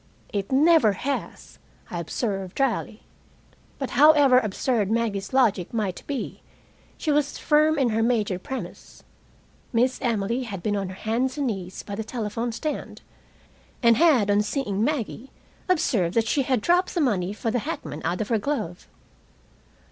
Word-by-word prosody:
"It 200 +1 -2
never 280 -5 +5
has," 275 +8 -5 0.3
I 175 - -3
observed 195 +2 -3
dryly. 240 -4 -1 0.7
But 270 - -4
however 285 -2 +6
absurd 215 -1 -1
Maggie's 220 -4 -1
logic 225 -9 +2
might 200 -5 -2
be, 275 -4 -4 0.6
she 310 - -1
was 290 0 +1
firm 305 +1 +3
in 265 -4 +2
her 225 0 0
major 220 -6 +1
premise. 210 -4 -8 0.7
Miss 250 +2 +1
Emily 235 -1 0
had 200 -8 -6
been 210 -1 0
on 195 -2 -2
her 185 - -8
hands 245 +7 -1
and 285 - 0
knees 190 -6 -4
by 205 - -7
the 220 +2 -3
telephone 230 +1 -3
stand, 300 +7 -5 0.8
and 235 -1 +6
had, 270 -10 +4
on 205 +1 +4
seeing 210 -2 -1
Maggie, 265 -2 -2 0.4
observed 230 - +1
that 225 -1 +2
she 280 - +2
had 255 -3 0
dropped 360 - +2
the - - +1
money 200 -9 +1
for 225 +2 -3
the 245 - 0
hackman 155 -7 -5
out 175 +4 -1
of 210 - -3
her 225 -2 +2
glove. 200 - -3
230 Hz, 155 wpm, -25 LUFS, 200-270 Hz, 0.8 s, however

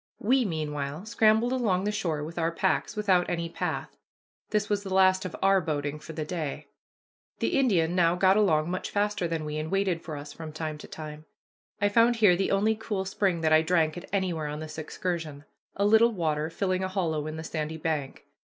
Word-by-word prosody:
We 255 +3 +2
meanwhile 150 -1 -3
scrambled 220 +1 +3
along 205 -8 +1
the 210 - 0
shore 170 -8 -2
with 165 +3 -6
our 165 0 +1
packs, 190 +5 0
without 190 -4 +2
any 170 -1 -2
path. - - -4 0.5
This 210 -1 0
was 205 -1 0
the 195 -2 -7
last 185 0 +4
of 185 - -5
our 195 0 +5
boating 145 -2 -3
for 160 - -9
the 155 -1 -4
day. 155 -4 -4 0.7
The - - 0
Indian 180 -11 +2
now 175 -1 +3
got 190 +1 +4
along 170 -6 +2
much 185 - -3
faster 205 -3 0
than 165 -2 -3
we, 150 0 -4
and 155 +1 -3
waited 195 -3 0
for 155 -3 -6
us 145 0 -8
from 160 -2 -8
time 155 -1 -4
to - - -10
time. 155 0 -8 0.5
I 205 - +3
found 230 +3 +4
here 210 -6 +5
the 190 +2 0
only 205 +3 +3
cool 210 -3 -3
spring 190 -3 0
that 155 -1 +3
I 155 - +7
drank 160 -2 +1
at 175 - -9
anywhere 180 -6 -1
on 150 +1 -5
this 155 0 -7
excursion, 155 -2 -4 0.3
a 200 - +1
little 220 +3 +5
water 155 -5 -1
filling 185 +2 -1
a - - 0
hollow 165 -6 -1
in 155 +1 -5
the 160 - -5
sandy 160 -1 -4
bank. 155 -4 -3
175 Hz, 210 wpm, -27 LUFS, 155-200 Hz, 0.7 s, I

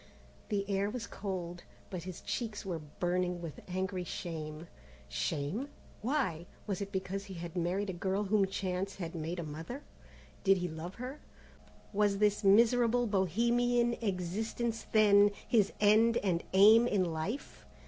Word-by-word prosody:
The 200 -2 -1
air 200 0 +1
was 235 +1 -4
cold, 175 -3 -5 0.3
but 180 -3 -4
his 185 -2 -7
cheeks 220 -5 -4
were 175 -4 -3
burning 175 +4 -1
with 165 -3 -7
angry 185 0 -2
shame. 160 -2 -5 0.4
Shame? 145 - -2 0.3
Why? 210 - -1 0.2
Was 200 -1 -2
it 200 0 -4
because 195 0 -3
he 195 -2 -8
had 170 0 -7
married 185 +3 0
a - - -7
girl 190 +3 -1
whom 200 -1 +2
chance 190 0 -2
had 170 -3 -5
made 165 +1 -4
a 170 - -3
mother? 160 - -7 0.6
Did 195 -1 +5
he 180 0 -1
love 165 +3 -7
her? 255 +5 -6 0.7
Was 205 -1 +2
this 210 +1 +2
miserable 235 +4 +5
bohemian 235 +5 +2
existence, 220 +4 -2
then, 205 -2 +6 0.2
his 215 -5 +3
end 220 +3 +5
and 180 -4 0
aim 215 +5 +8
in 195 -5 +2
life? 170 - -4
195 Hz, 150 wpm, -32 LUFS, 175-215 Hz, 0.7 s, aim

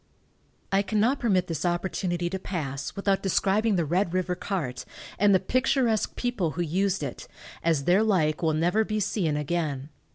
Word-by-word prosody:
I 195 0 +4
cannot 220 +6 +1
permit 195 -8 +2
this 165 -4 -4
opportunity 175 0 -1
to 190 - -3
pass 140 -8 -4
without 200 -1 +1
describing 200 +3 +2
the 170 -3 +1
Red 175 +3 0
river 185 -1 0
cart, 170 -9 -3 0.4
and 205 +1 +5
the - - +4
picturesque 245 +1 +1
people 235 -10 -1
who 175 - +1
used 185 +2 0
it, 135 - -6 0.4
as 160 -4 +2
their 180 +7 +4
like 170 -9 +2
will 160 -2 +2
never 175 +7 +2
be 215 0 -2
seen 170 -7 0
again. 150 -2 -2
185 Hz, 165 wpm, -26 LUFS, 165-205 Hz, 0.4 s, and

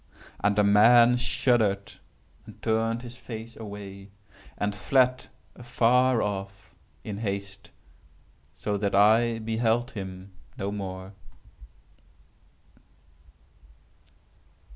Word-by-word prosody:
And 100 0 +2
the 105 - +3
man 115 +4 +6
shuddered, 110 -5 +1 0.5
and - - -13
turned 115 +1 0
his 120 0 -10
face 115 -2 -9
away, 100 -2 -9 0.5
and 105 0 -1
fled 125 +4 +1 0.3
afar 120 0 +2
off, 100 -1 -6 0.3
in 105 -2 -6
haste, 100 -2 -5 0.9
so 105 +5 -2
that 100 -1 -1
I 115 +3 +4
beheld 115 +2 0
him 95 -2 -8 0.2
no 100 +1 -3
more." 95 -1 -6
105 Hz, 90 wpm, -26 LUFS, 100-120 Hz, 0.9 s, man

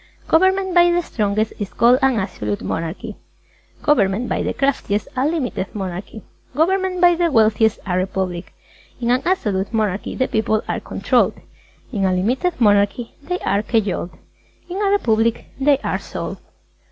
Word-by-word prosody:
Government 375 +2 +3
by 350 0 +6
the 350 0 +1
Strongest 215 -4 -1
is 205 -2 -4
called 245 +2 +4
an 265 -2 +3
Absolute 105 - -3
Monarchy. 180 +7 -4 0.7
Government 235 -5 +2
by - - -1
the - - -1
Craftiest, 260 -7 -1
a 260 +2 +1
Limited 260 - -3
Monarchy. 195 +2 -6 0.3
Government 370 +3 +1
by 350 0 +6
the 340 -1 +1
Wealthiest, 220 -2 +3
a 180 -3 -1
Republic. 185 -1 -2 0.5
In 240 -1 0
an 250 +1 +2
Absolute 210 - 0
Monarchy, 215 -3 -1
the 260 - 0
People 220 0 0
are - - -2
Controlled. - - +1 0.6
In 200 -3 0
a 185 - +2
Limited 255 - 0
Monarchy, 205 +1 +2
they 360 +5 -3
are 200 +1 +2
Cajoled. 210 -5 -1 0.6
In 370 +3 -4
a 400 - +2
Republic, 230 - +1
they 280 +1 +4
are - - -1
Sold. - - -6
225 Hz, 155 wpm, -20 LUFS, 200-310 Hz, 0.7 s, by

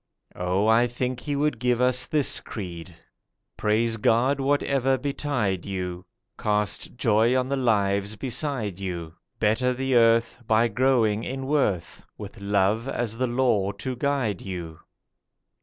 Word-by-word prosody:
Oh, 90 +3 0
I 115 +2 +4
think 125 +1 -3
He 145 +3 -3
would 150 +1 0
give 125 -1 +1
us 125 0 +2
this 150 -3 +1
creed: 90 -4 -8 0.6
'Praise 115 +2 +1
God 120 +6 +2
whatever 135 -1 +1
betide 130 -8 -1
you; 90 -2 -5 0.3
Cast 105 +1 -1
joy 115 +1 +3
on 130 0 0
the 140 - +1
lives 100 -5 +1
beside 120 - -3
you; 85 -4 -5 0.3
Better 120 +4 +2
the 135 +1 -1
earth, 115 -1 +4
by 115 +1 +3
growing 115 -2 +2
in 135 +1 -4
worth, 130 - 0
With - - -9
love 100 +4 +1
as 115 -3 -3
the 130 - +1
law 120 -5 +1
to 125 +6 -5
guide 125 -7 -1
you. 85 -4 -6
115 Hz, 140 wpm, -25 LUFS, 100-130 Hz, 0.6 s, I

